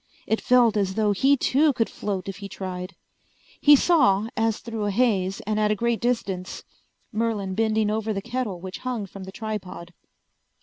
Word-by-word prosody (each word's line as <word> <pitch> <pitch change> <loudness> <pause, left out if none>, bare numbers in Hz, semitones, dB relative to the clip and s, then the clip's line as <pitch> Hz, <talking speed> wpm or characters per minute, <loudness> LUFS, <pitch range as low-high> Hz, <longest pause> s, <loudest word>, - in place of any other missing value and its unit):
It 220 - 0
felt 240 -3 +4
as 190 -2 0
though 215 -2 +2
he 270 +8 +3
too 285 +3 +3
could 225 -2 0
float 195 -3 -4
if 195 - -5
he 200 -1 -8
tried. 185 0 -6 0.7
He 295 0 +8
saw, 225 - +3
as 225 -1 +1
through 225 -3 -5
a - - 0
haze 195 -4 +1
and 215 +1 -2
at 210 0 +2
a 215 - +2
great 235 +2 0
distance, 200 -7 -2 0.5
Merlin 215 -4 -1
bending 220 0 +1
over 220 0 -1
the 200 - -1
kettle 235 -3 -3
which 185 +1 -7
hung 245 -5 -3
from 195 0 -10
the 190 - -8
tripod. 190 -5 -6
215 Hz, 180 wpm, -24 LUFS, 195-230 Hz, 0.7 s, He